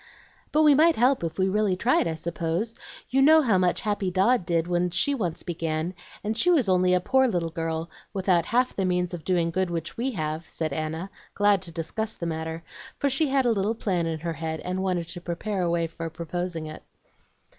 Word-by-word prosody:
"But 310 - +4
we 300 -1 +7
might 320 +4 +5
help 250 -1 +3
if 160 -1 -3
we 190 - +2
really 205 -1 +1
tried, 230 0 +2
I 160 - -2
suppose; 170 +6 -2 0.4
you 270 +1 +3
know 315 +3 +7
how 215 -8 +3
much 180 -1 +1
Happy 205 -4 -1
Dodd 190 +2 +2
did 165 -1 +1
when 175 0 +1
she 180 +11 +1
once 180 - -2
began, 165 0 -2 0.3
and 215 +2 -1
she 335 +11 +2
was 300 - +4
only 180 -1 +3
a - - +3
poor 265 +8 +3
little 175 -7 -1
girl 165 -1 -3 0.2
without 185 -4 +1
half 250 +2 +1
the 195 - 0
means 180 -1 0
of 170 -3 -6
doing 170 -3 +1
good 185 +1 0
which 170 -1 -4
we 245 +3 0
have," 155 -2 -4
said 155 -3 -3
Anna, 160 +5 -4 0.2
glad 205 -2 +3
to 175 -3 -6
discuss 170 +7 -3
the 170 - -5
matter, 160 0 -4 0.3
for 280 - +1
she 295 +4 +2
had 270 -1 +2
a 240 - +4
little 210 +1 0
plan 180 -6 -1
in 160 -2 -3
her 165 0 -2
head 160 0 -4
and 185 +1 -3
wanted 180 -3 -1
to 175 +1 -7
prepare 185 +3 -3
a 175 - +1
way 170 0 +1
for 165 0 -6
proposing 170 +1 -4
it. 155 0 -8
180 Hz, 220 wpm, -26 LUFS, 165-215 Hz, 0.4 s, we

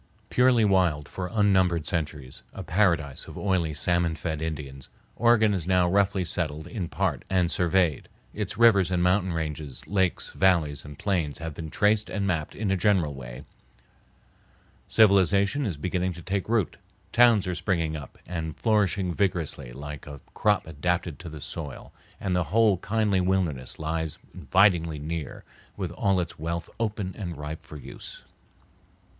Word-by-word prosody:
Purely 125 -3 +4
wild 90 -7 +2
for 90 -1 -5
unnumbered 95 -6 +3
centuries, 75 -5 -4
a - - -6
paradise 85 -7 +1
of - - -9
oily, 90 -5 0
salmon 85 +2 0
fed 80 -1 -4
Indians, 70 -4 -5 0.3
Oregon 110 -3 +4
is 90 -4 -2
now 90 -1 +3
roughly 95 0 +2
settled 80 -3 -2
in 100 -7 -4
part - - -1
and 90 -2 +2
surveyed, 90 -3 +1 0.2
its 105 -2 -4
rivers 105 -6 +5
and 90 -1 +1
mountain 90 +1 +2
ranges, 75 -4 -4
lakes, 95 -3 0
valleys, 85 -6 +2
and 75 -1 -10
plains 85 -8 -1
have 80 0 -5
been 80 +1 -7
traced 105 +5 +2
and 100 -2 -2
mapped 85 -5 -2
in 105 -2 -1
a - - +3
general 95 -7 +2
way, 65 0 -9 1.4
civilization 100 - +4
is 90 -7 -3
beginning 90 +3 -1
to 85 0 -11
take 95 +3 -2
root, 110 -6 +1 0.3
towns 115 -4 +5
are 90 - -2
springing 85 -3 -1
up 75 -4 -9
and 80 -2 -4
flourishing 100 -5 +1
vigorously 85 -10 -1
like 75 +3 -8
a 70 -1 -8
crop 105 -1 +2
adapted 85 +1 -2
to 85 - -8
the 75 -1 -9
soil, 70 -3 -7 0.3
and 95 -2 -1
the 90 -1 +1
whole 105 +3 +3
kindly 105 0 +1
wilderness 90 -9 -1
lies 80 -1 -3 0.2
invitingly 85 -5 +3
near 75 0 -5 0.3
with 95 -4 -3
all 95 +1 +1
its 85 -4 -4
wealth 85 +2 -4
open 105 -4 -2
and 85 -6 -5
ripe 75 +2 -6
for 75 0 -10
use. 70 - -10
90 Hz, 155 wpm, -26 LUFS, 80-100 Hz, 1.4 s, rivers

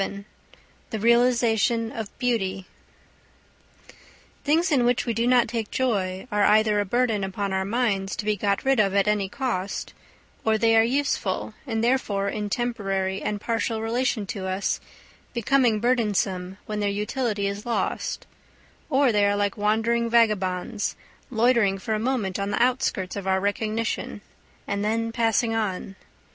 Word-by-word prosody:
VII 200 0 -4 0.6
THE 220 - -3
REALISATION 235 -1 +3
OF 220 -3 -5
BEAUTY 195 -7 -1 1.8
Things 320 +4 +2
in 265 -5 +3
which 245 0 +2
we 235 - 0
do 230 +2 0
not 245 -1 +4
take 225 -2 -3
joy 195 -7 -1
are 210 0 +2
either 210 0 +4
a 205 - 0
burden 225 -1 +1
upon 195 +1 -3
our 190 0 0
minds 200 -3 0
to 210 - -5
be 210 0 +2
got 200 +2 -1
rid 270 -3 +3
of 200 -2 +2
at 200 +1 +3
any 205 -2 +1
cost; 220 -7 -3 0.5
or 220 0 +2
they 225 0 +3
are 225 - +7
useful, 270 +4 -1
and 225 -2 -1
therefore 210 -5 +1
in 210 0 -3
temporary 195 -5 -1
and 210 -1 -2
partial 225 +1 -1
relation 225 -1 -1
to 190 -1 -5
us, 190 +1 -1 0.6
becoming 235 -1 +2
burdensome 200 -6 0
when 210 -1 -4
their 205 -1 +1
utility 210 +1 -1
is 200 +1 -3
lost; 240 - -2 0.6
or 270 -3 +3
they 205 -2 +3
are 205 - +2
like 205 -1 0
wandering 225 +3 +1
vagabonds, 210 -2 +1 0.3
loitering 230 -5 +3
for 220 +3 -3
a 215 - 0
moment 220 -6 -1
on 200 0 -1
the 205 - -1
outskirts 245 -7 0
of 200 -1 -5
our 190 0 +2
recognition, 215 +2 -2 0.5
and 200 0 -1
then 225 +2 0
passing 225 -1 +1
on. 195 -3 -2
215 Hz, 155 wpm, -25 LUFS, 200-235 Hz, 1.8 s, are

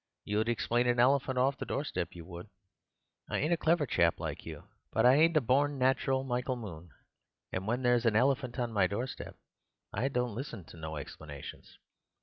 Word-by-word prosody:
"You'd 110 +3 0
explain 120 +1 +1
an 120 0 +2
elephant 130 +1 +3
off 135 +2 +2
the - - -3
doorstep, 95 - -3
you 85 -2 -9
would. 90 +3 -9 0.8
I - - -1
ain't 155 +4 +1
a - - +5
clever 165 -1 +2
chap - - +2
like - - -5
you; - - -7 0.3
but - - +2
I 125 - +8
ain't 160 +3 +5
a - - +4
born 140 +4 +2
natural, 130 0 +2
Michael 125 0 -1
Moon, 90 -8 -8 0.6
and 95 +2 -3
when 120 +3 0
there's 120 -1 +3
an 110 - +3
elephant 130 +1 +2
on 120 -2 -2
my 95 -3 +3
doorstep 120 +7 -5 0.6
I 120 +7 0
don't 125 -4 -1
listen 120 - -6
to - - -12
no 80 -1 -5
explanations. 75 0 -9
125 Hz, 185 wpm, -31 LUFS, 105-135 Hz, 0.8 s, I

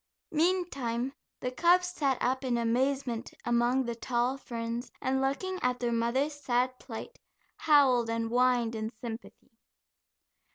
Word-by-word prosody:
Meantime, 280 -8 0 0.3
the 250 - -2
cubs 355 +6 +4
sat 280 -7 0
up 260 +2 0
in 250 -2 +1
amazement 245 +1 0
among 240 +2 +2
the 235 - -2
tall 240 +2 0
ferns, 235 -2 -5
and 265 +1 0
looking 365 +8 -1
at 250 0 0
their 240 -1 0
mother's 235 +6 +1
sad 255 -3 0
plight, 240 - -8 0.4
howled 265 -6 +4
and 230 0 -1
whined 245 -1 +2
in 220 0 -3
sympathy. 230 0 -8
250 Hz, 130 wpm, -30 LUFS, 235-275 Hz, 0.4 s, cubs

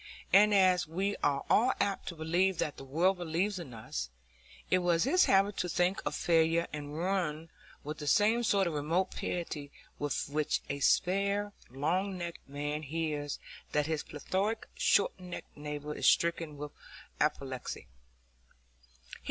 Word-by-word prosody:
And 210 +2 +7
as 185 -3 +4
we 190 +5 -1
are 140 -1 0
all 250 +4 +4
apt 200 -1 -1
to 170 - -4
believe 170 +3 +1
what 150 - -1
the - - -8
world 175 +8 +1
believes 175 +4 -1
about 125 -10 -9
us, 65 -3 -4 0.6
it 185 - +5
was 175 -2 +2
his 360 +8 +4
habit 195 +1 +3
to 180 - -1
think 180 +3 +1
of 145 - -2
failure 165 0 +3
and 145 0 -6
ruin 165 -3 -1 0.3
with 150 +1 -6
the 150 - -5
same 215 - +4
sort 200 -4 +2
of 170 - -1
remote 160 +6 0
pity 150 -5 -4 0.3
with 145 -1 -1
which 150 +1 0
a 140 - -3
spare, 200 +6 +2 0.2
long 180 +9 -1
necked 170 -4 -7
man 145 +2 -3
hears 150 -1 -3 0.4
that 150 0 +2
his 160 -1 -1
plethoric 195 +9 -2
short 200 - +2
necked 180 -1 -8
neighbour 150 0 -5
is - - 0
stricken 165 -3 +2
with 145 0 -6 0.5
apoplexy. 135 -4 -2
165 Hz, 150 wpm, -31 LUFS, 150-190 Hz, 0.6 s, And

